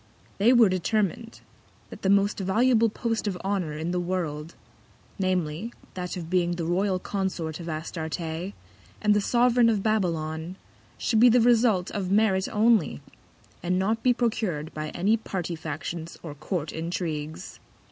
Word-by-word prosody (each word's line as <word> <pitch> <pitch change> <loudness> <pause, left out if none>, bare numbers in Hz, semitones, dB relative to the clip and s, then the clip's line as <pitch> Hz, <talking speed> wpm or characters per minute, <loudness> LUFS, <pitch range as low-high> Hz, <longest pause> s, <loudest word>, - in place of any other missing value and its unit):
They 220 +5 +5
were 240 -3 +7
determin'd, 205 +4 -1 0.5
that - - -10
the 190 - 0
most 200 +1 +3
valuable 225 +4 +3
Post 225 0 -2
of 190 -3 -1
Honour 190 -6 -1
in 160 +3 -3
the 180 - 0
World, 170 -3 -3 0.6
namely, 185 +2 -1 0.2
that 180 0 -4
of 170 -2 -6
being 175 0 +1
the 170 -1 -3
Royal 185 +3 +1
Consort 185 -4 -3
of 170 -1 -6
Astarte, 160 +1 -4
and 175 +5 -3
the 205 - +2
Sovereign 240 +1 +4
of 210 -3 0
Babylon, 170 -5 -1 0.4
should 220 - +1
be 245 +2 +8
the 245 +2 +5
Result 230 -5 +3
of 190 -3 -3
Merit 195 -2 +3
only; 215 - +3 0.6
and 180 +2 0
not 215 +4 0
be 250 - +4
procur'd 215 -10 -1
by 155 0 -4
any 200 +8 +1
Party 180 -5 -4
Factions 160 +2 -6
or 160 -4 -6
Court 155 +1 -3
Intrigues. 160 -2 -4
185 Hz, 150 wpm, -26 LUFS, 165-215 Hz, 0.6 s, be